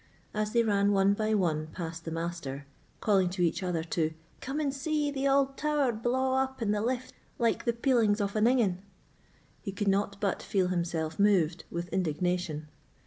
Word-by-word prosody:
As 215 0 -1
they 235 0 +3
ran 205 -2 +2
one 195 0 +4
by 215 +1 0
one 155 -6 0
past 165 -2 -6
the - - -3
Master, 165 -4 -4 0.4
calling 195 -4 +3
to 180 0 -1
each 165 +1 +1
other 175 -3 -1
to 160 -1 -1 0.2
"Come 275 +3 -3
and 285 -3 0
see 295 +1 -1
the 275 0 0
auld 275 0 +2
tower 295 -4 +1
blaw 260 +4 +1
up 265 0 -3
in 220 -3 0
the 210 0 0
lift 250 +2 -2 0.2
like 230 -1 +1
the 235 - +2
peelings 230 -4 +2
of 200 0 -1
an 215 0 +3
ingan," 225 -8 +2 0.8
he 200 - -4
could 205 +1 -3
not 200 0 +1
but 200 -3 -1
feel 185 -3 0
himself 170 -2 -2
moved 185 -5 +3
with 170 +1 -4
indignation. 175 -2 -1
200 Hz, 185 wpm, -29 LUFS, 175-240 Hz, 0.8 s, one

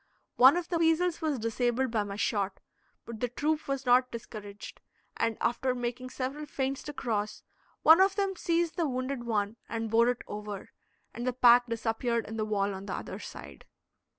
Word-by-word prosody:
One 260 +6 +8
of 350 -1 -3
the 340 - 0
weasels 330 +1 +2
was 310 -4 0
disabled 240 +2 0
by 220 -2 +1
my 200 -1 -4
shot, 200 -2 -1 0.5
but 230 -2 -8
the 245 - 0
troop 300 +6 -1
was 275 -1 -2
not 250 +1 +5
discouraged, 215 -3 -9 0.3
and, 230 -1 0
after 250 +2 0
making 245 +1 -4
several 275 +4 -4
feints 270 -1 -2
to 295 - -5
cross, 215 -6 -3 0.4
one 325 +4 +8
of 385 0 +4
them 395 -1 0
seized 340 -1 0
the 330 -4 +1
wounded 255 -1 -3
one 215 -1 -1
and 225 -1 -3
bore 230 +2 +5
it 245 - -2
over, 210 -1 -7 0.4
and 240 +1 -5
the 255 - +1
pack 245 0 +6
disappeared 230 0 -1
in 220 - -6
the 215 -1 -1
wall 200 -2 0
on 190 +1 -8
the 185 - -3
other - - -6
side. - - -10
245 Hz, 185 wpm, -29 LUFS, 220-275 Hz, 0.5 s, One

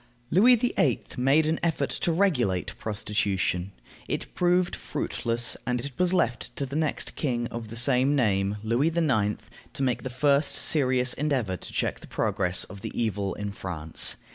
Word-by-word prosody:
Louis 235 +8 +6
VIII. 215 - +1
made 135 +5 +3
an 160 +1 0
effort 155 -5 0
to 170 - -1
regulate 135 - +1
prostitution. 100 -3 -1 0.4
It - - -4
proved 180 0 +2
fruitless, 120 +1 -2
and 125 0 0
it 140 - -5
was 180 -1 +3
left 120 -11 0
to 140 - -2
the 135 +2 -7
next 155 -1 -1
king 120 -5 -1
of 115 -1 -6
the 110 - -8
same 130 +3 +4
name, 100 -5 +1
Louis 120 +7 +1
IX., 135 -12 +1 0.3
to 135 - -2
make 125 -2 0
the 130 - -5
first 140 +3 +2
serious 130 -4 +1
endeavor 130 -10 -1
to - - -9
check - - -1
the - - -13
progress 90 -1 +1
of 100 -2 -10
the - - -5
evil 100 -4 -1
in 105 0 -4
France. 85 -5 0
125 Hz, 165 wpm, -26 LUFS, 105-150 Hz, 0.4 s, Louis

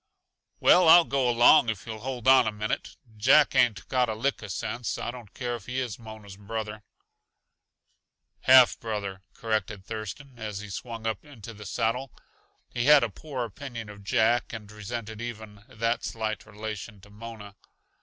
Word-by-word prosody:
"Well, 180 -2 +6
I'll 170 +1 +9
go 135 -2 +1
along, 120 -1 +6
if 100 -3 -4
you'll 110 -1 -6
hold 125 0 -5
on 130 -3 +7
a - - 0
minute. 105 0 -4 0.2
Jack 135 +7 +5
ain't 110 -7 +2
got 125 -2 +1
a 110 - -2
lick 135 +5 -1
uh 105 - -7
sense. 110 +4 -3
I - - -3
don't 120 -5 -12
care 120 -2 -3
if 110 -4 -11
he 125 +1 -2
is 120 -4 -4
Mona's 110 -3 -11
brother." 105 +1 -5 1.6
"Half 130 -1 +6
brother," 100 -4 -4
corrected 110 -3 -2
Thurston, 115 +5 -7
as 105 -3 -5
he 105 -1 -9
swung 115 +2 -6
up 110 -3 -2
into 115 -6 -11
the 105 -1 -10
saddle. 120 +5 -1 0.6
He 120 0 -3
had 150 -1 +7
a 115 - 0
poor 130 +2 -5
opinion 115 0 -8
of 100 -1 -12
Jack 120 +2 +2
and 105 -2 -8
resented 110 +1 -6
even 110 -3 -8
that 115 -1 -1
slight 110 -1 -4
relation 105 0 -7
to 100 +1 -17
Mona. 105 -2 -10
110 Hz, 170 wpm, -27 LUFS, 105-120 Hz, 1.6 s, I'll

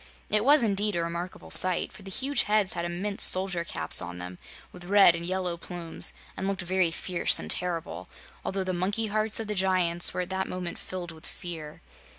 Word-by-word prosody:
It 210 0 +3
was, 285 +1 +5
indeed, 205 -1 +1
a 170 - -1
remarkable 170 +2 -7
sight, 185 -2 +6
for - - -14
the 195 - -10
huge 270 +8 0
heads 210 -3 +2
had 170 -1 -4
immense 190 +4 -3
soldier 185 -2 +4
caps 80 - +3
on 90 0 -8
them, 90 0 -9 0.3
with 180 -1 -12
red 195 -2 +5
and 170 0 -6
yellow 180 -1 -3
plumes 170 -1 -6 0.2
and 190 - -4
looked 195 -1 -3
very 185 -1 +1
fierce 170 +1 -1
and - - -3
terrible, 175 -2 -3 0.3
although 195 0 -3
the 185 0 -3
monkey 200 +5 -2
hearts 215 0 +2
of 225 - -3
the 210 - -3
giants 185 -3 +2
were - - -3
at 180 +1 -7
that 190 0 -3
moment 180 -1 -6
filled 180 -2 -7
with 160 0 -11
fear. 160 -5 -9
185 Hz, 200 wpm, -26 LUFS, 170-195 Hz, 0.3 s, sight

